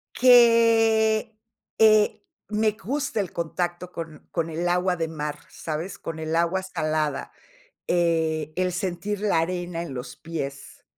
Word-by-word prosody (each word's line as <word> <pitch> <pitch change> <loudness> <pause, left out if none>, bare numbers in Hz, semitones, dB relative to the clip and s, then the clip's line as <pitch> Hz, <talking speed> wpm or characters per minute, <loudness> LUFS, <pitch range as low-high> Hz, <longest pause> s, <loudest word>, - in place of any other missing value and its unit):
Que, 225 -3 +5 0.4
eh, 215 -1 +5 0.3
me 215 0 +2
gusta 270 +3 -3
el 195 -4 -2
contacto 175 +1 -3
con 160 -3 -8
con 165 -1 -1
el 170 +2 -1
agua 180 +1 +2
de 165 -1 -2
mar, 150 -2 -5
¿sabes?, 165 +4 -5
con 165 -1 -6
el 160 +1 -2
agua 170 +3 +1
salada, 155 -5 -2 0.6
eh, 160 -3 +1
el 185 +1 0
sentir 185 +3 -3
la 205 -6 +2
arena 175 0 -3
en 150 -6 -7
los 125 0 -7
pies. 140 -4 -7
175 Hz, 135 wpm, -25 LUFS, 160-210 Hz, 0.6 s, Que